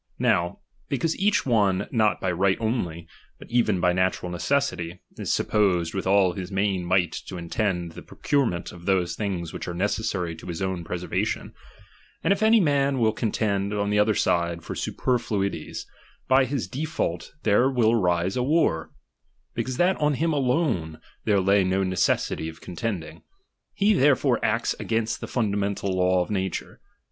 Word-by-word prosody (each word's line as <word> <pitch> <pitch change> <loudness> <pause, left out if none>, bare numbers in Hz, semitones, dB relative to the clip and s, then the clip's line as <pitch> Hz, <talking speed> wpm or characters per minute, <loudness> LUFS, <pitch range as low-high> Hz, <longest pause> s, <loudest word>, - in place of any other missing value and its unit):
Now, 85 0 +1 0.3
because 155 +4 0
each 205 +1 +2
one 100 -6 +2
not 110 -3 +2
by 95 - 0
right 95 +2 +2
only, 90 -8 -2 0.3
but - - -14
even 115 -6 +2
by 90 0 +3
natural 90 -1 0
necessity, 90 -5 -1 0.2
is - - -2
supposed 90 -6 +1
with 95 -1 -3
all 95 -2 +4
his 90 +1 -6
main 95 -2 0
might 90 -2 +2 0.2
to 90 - -6
intend 85 0 -2
the - - -10
procurement 120 -12 -1
of 85 +1 -12
those 95 -3 +2
things 90 -6 -3
which - - -6
are 85 - -4
necessary 90 -3 -1
to - - -11
his 85 -2 -4
own 95 -2 -2
preservation; 90 +1 -3 0.7
if 200 +1 +2
any 220 +1 +6
man 140 -5 +2
will 110 -3 +3
contend 105 -2 -1
on 100 0 0
the 105 - +3
other 105 0 +3
side 85 -1 0
for - - -5
superfluities, 105 -9 -2 0.4
by 130 0 +5
his 130 -1 -2
default 140 - -3
there 110 +5 +4
will 120 -4 +3
arise 90 -4 +1
a 125 - 0
war; 130 - +1 0.6
because 130 -1 -3
that 180 +2 +3
on 150 -1 +1
him 165 +3 0
alone 125 - 0 0.3
there 105 -2 +3
lay 100 +1 +3
no 95 +1 +1
necessity 95 -3 0
of 80 0 -12
contending; 90 -2 -5 0.5
he 205 +2 +3
therefore 140 -5 +3
acts 115 +2 +1
against 115 0 -1
the - - -5
fundamental 100 -4 -1
law 90 0 +3
of 90 - -9
nature. 95 -2 -3
100 Hz, 160 wpm, -25 LUFS, 90-125 Hz, 0.7 s, any